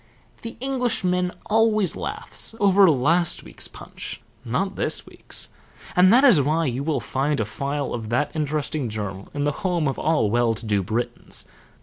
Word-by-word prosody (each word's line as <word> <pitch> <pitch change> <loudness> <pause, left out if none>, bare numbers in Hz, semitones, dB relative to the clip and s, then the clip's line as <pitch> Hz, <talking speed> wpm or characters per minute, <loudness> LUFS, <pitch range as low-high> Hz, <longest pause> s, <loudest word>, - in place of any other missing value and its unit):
The 230 0 -7
Englishman 225 -9 0
always 215 -4 +2
laughs - - -4
over 195 -2 +6
last 160 +5 +2
week's - - -4
Punch, - - -8 0.2
not - - -1
this - - -2
week's, - - -2 0.5
and 185 +1 +6
that 250 +4 +6
is 225 - +7
why 155 +4 +1
you 130 -1 -1
will 155 0 0
find 140 +1 -1
a 110 - +1
file 140 +6 -3
of 110 -3 -4
that 125 +5 +1
interesting 150 -3 -1
journal 100 -2 -5
in 145 - -1
the 145 - +2
home 175 -5 +1
of 135 - -2
all 150 -10 +2
well 120 -1 +2
to 115 - -7
do 105 -2 +1
Britons. 120 +5 -3
150 Hz, 165 wpm, -24 LUFS, 120-185 Hz, 0.5 s, is